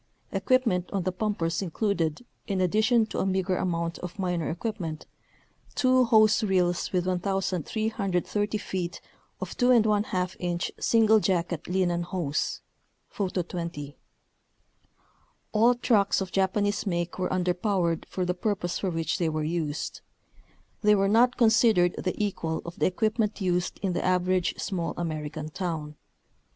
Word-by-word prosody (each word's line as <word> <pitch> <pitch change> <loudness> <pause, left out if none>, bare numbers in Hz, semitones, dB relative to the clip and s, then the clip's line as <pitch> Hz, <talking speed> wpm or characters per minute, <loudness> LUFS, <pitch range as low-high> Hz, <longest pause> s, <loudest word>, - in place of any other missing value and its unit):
Equipment 195 -3 +1
on 195 -3 -1
the 185 - 0
pumpers 185 -4 -1
included, 180 0 -1 0.2
in 195 -2 -1
addition 215 +5 +3
to - - -5
a - - +1
meager 190 -1 0
amount 170 -2 -2
of 180 +1 -7
minor 180 -4 -1
equipment, 175 -4 -4 0.7
two 255 -1 +4
hose 220 -1 +5
reels 180 -3 +1
with 180 -2 0
1,330 195 +2 -1
feet 185 -4 -4 0.4
of - - -5
2Vi 210 -7 +2
inch 175 -1 -2
single 220 -1 +4
jacket 175 -4 -1
linen 180 -1 +1
hose 170 -4 -2 0.5
(Photo 185 -3 -2
20). 165 -4 -6 1.6
All 230 +3 +4
trucks 220 -5 +2
of 190 -2 -4
Japanese 205 +2 0
make 175 -1 -2
were 180 - 0
underpowered 180 -1 0
for 185 - -2
the 180 - 0
purpose 180 -2 -2
for 195 - -1
which 165 +2 -1
they 170 -2 +1
were 155 0 -2
used. 155 -2 -3 0.8
They 210 -1 +5
were 195 -1 +2
not 240 +4 +4
considered 220 -6 +4
the 185 - -2
equal 170 -6 -2
of 170 0 -8
the - - +3
equipment 215 +3 0
used 180 -2 0
in 190 -2 0
the - - -1
average 185 0 +1
small 180 -5 -3
American 155 -2 -4
town. 155 -3 -4
185 Hz, 135 wpm, -27 LUFS, 175-210 Hz, 1.6 s, hose